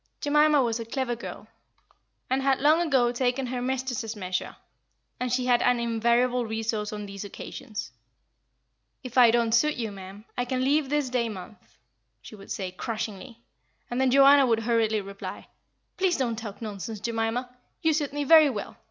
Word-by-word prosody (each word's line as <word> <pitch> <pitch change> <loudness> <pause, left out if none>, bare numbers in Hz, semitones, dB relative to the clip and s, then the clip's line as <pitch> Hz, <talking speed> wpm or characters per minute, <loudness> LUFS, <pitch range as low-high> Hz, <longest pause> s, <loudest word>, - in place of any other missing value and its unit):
Jemima 295 -1 +4
was 235 -1 -1
a 230 - -5
clever 245 +1 -2
girl, 235 - -8 0.8
and 260 +1 0
had 270 -1 +2
long 305 +5 +4
ago 265 -8 +2
taken 250 +2 0
her 250 0 -3
mistress's 250 -3 -2
measure; 185 -3 -4 0.6
and 250 -1 -2
she 250 0 0
had 245 -1 +3
an 245 -1 +3
invariable 235 +2 +1
resource 220 -1 -3
on 210 -1 -5
these 200 0 -7
occasions. 215 +2 -7 1.1
"If 255 -2 -8
I 245 -2 +7
don't 230 0 +2
suit 300 +7 +3
you, 225 -3 -3
ma'am, 195 +2 -11
I 245 - -1
can 255 +1 -1
leave 285 +1 +2
this 290 -3 0
day 240 -2 0
month," 195 -1 -11 0.4
she 115 - -13
would 195 -1 -14
say, 185 -2 -4
crushingly; 225 +4 -6 0.5
and 245 +2 0
then 265 - +3
Joanna 275 +1 +6
would 225 -1 +2
hurriedly 225 -2 +1
reply, 200 0 -8 0.5
"Please 370 -2 +2
don't 245 -4 -1
talk 220 -1 -8
nonsense, 210 0 -6
Jemima. 230 +3 -2 0.3
You 320 -1 +3
suit 295 -2 -1
me 290 +1 -2
very 310 0 +7
well. 210 -6 -6
240 Hz, 170 wpm, -26 LUFS, 220-265 Hz, 1.1 s, I